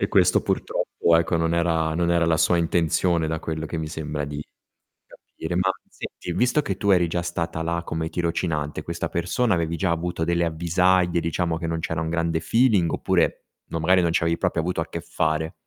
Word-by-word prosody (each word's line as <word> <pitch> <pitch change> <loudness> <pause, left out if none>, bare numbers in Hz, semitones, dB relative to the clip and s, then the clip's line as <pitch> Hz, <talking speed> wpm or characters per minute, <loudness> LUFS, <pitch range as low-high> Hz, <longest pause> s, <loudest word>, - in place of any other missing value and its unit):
E - - +1
questo - - +4
purtroppo 85 -1 +1
ecco, 85 0 +1
non 80 0 +1
era 80 -2 +1
non 85 0 +1
era 85 -1 +3
la 80 - +3
sua 90 - +3
intenzione 85 0 +1
da 80 0 -2
quello 80 0 -4
che 80 +1 -4
mi 80 - -3
sembra 75 -2 -4
di 75 0 -5 0.7
capire. 80 +2 -7
Ma 95 +1 +2 0.2
senti, 90 - -7
visto 125 - +2
che 95 -6 -3
tu 100 +1 0
eri 90 -3 +4
già 85 +1 -1
stata 85 -1 -3
là 85 +1 -1
come 80 0 -3
tirocinante, 80 -3 -2
questa 85 +2 -4
persona 90 +7 0
avevi 85 -1 -1
già 95 -1 0
avuto 85 0 -1
delle 85 0 +1
avvisaglie, 85 +2 +2
diciamo, 85 0 -1
che 80 - -4
non 80 0 -2
c'era 80 0 -2
un 80 0 -2
grande 85 -1 0
feeling, 105 -1 +3
oppure, - - 0 0.2
no, 80 - -2
magari 90 +3 +4
non 85 - +1
ci - - +1
avevi 85 0 +1
proprio 90 -3 0
avuto 90 +1 -1
a 80 - -4
che 85 - -5
fare? 80 -1 -1
85 Hz, 205 wpm, -24 LUFS, 80-85 Hz, 0.7 s, questo